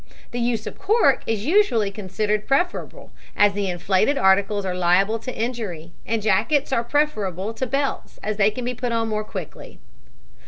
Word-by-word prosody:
The 245 - -3
use 235 -2 -1
of - - -7
cork 435 +4 +3
is 220 -1 -1
usually 290 - +3
considered 210 +1 -2
preferable, 350 +7 -1 0.3
as 205 -1 +5
the 200 -1 -1
inflated 190 +9 +1
articles 195 0 +3
are 185 - -1
liable 180 +5 +2
to 255 +3 -7
injury, 215 -9 -4 0.2
and 225 -2 -1
jackets 230 +8 +2
are 235 - +2
preferable 220 - -1
to 260 +3 -3
belts 275 +2 -2
as 215 -1 -2
they 210 0 +4
can 240 +3 -6
be 250 - -1
put 245 0 -3
on 230 -1 0
more 215 0 -1
quickly. - - -8
215 Hz, 170 wpm, -23 LUFS, 200-250 Hz, 0.3 s, as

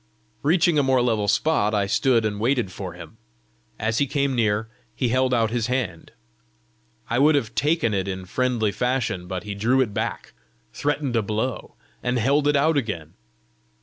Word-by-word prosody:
Reaching 165 0 +3
a - - +5
more 130 -2 +3
level 110 -4 +1
spot, 110 -4 +2
I 100 -1 +1
stood 115 +3 +2
and 105 -1 -2
waited 120 -3 +1
for - - -6
him. - - -12 0.6
As 110 +1 -1
he 140 - +2
came 140 0 0
near, 110 -2 +1 0.3
he 125 - 0
held 130 +1 +2
out 115 -3 +2
his 115 -2 -1
hand. 120 -10 -3 1.0
I 120 - 0
would 150 +2 +5
have 120 -6 -1
taken 145 -6 +1
it 95 -1 -1
in 95 -1 -4
friendly 120 +1 0
fashion, 110 -5 -1
but 95 +1 -4
he 105 -1 -5
drew 115 +6 +1
it 120 -6 +1
back, - - -4 0.4
threatened 145 -3 -1
a 115 - +3
blow, 110 +4 -3 0.3
and 125 0 0
held 140 +5 +2
it 145 - +3
out 155 +2 +3
again. 105 - -3
120 Hz, 180 wpm, -23 LUFS, 105-135 Hz, 1.0 s, a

